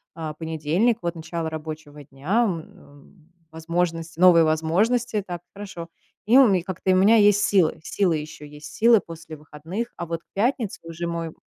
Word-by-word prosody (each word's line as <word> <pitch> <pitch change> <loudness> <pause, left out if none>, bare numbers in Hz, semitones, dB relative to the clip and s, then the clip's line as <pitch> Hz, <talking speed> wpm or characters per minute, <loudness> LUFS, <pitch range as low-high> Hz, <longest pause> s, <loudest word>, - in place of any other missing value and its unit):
А, 160 -2 -5
понедельник- 160 +8 0
вот 170 0 -3
начало 160 0 -5
рабочего 155 -2 -8
дня, 155 - -1
м, 160 -1 -10 0.2
в 160 - -38
возможности, 165 0 -3
новые 175 -2 +7
возможности, 205 +8 0
так, 175 -2 -6
хорошо. 195 -5 -8 0.4
И 240 +4 +6
у 270 - +8
ме 190 -4 +2
как-то 190 0 -2
у 185 - +4
меня 200 +5 +5
есть 205 -1 +5
силы 185 -6 +2
силы 175 -1 0
ещё 150 0 -9
есть, 150 0 -11
силы 230 0 +5
после 165 -3 -11
выходных. 160 +10 -6
А 170 - -4
вот 165 0 -5
к - - -45
пятнице 225 0 -1
уже 165 +1 -6
мой 165 -1 -4
170 Hz, 175 wpm, -23 LUFS, 160-195 Hz, 0.4 s, у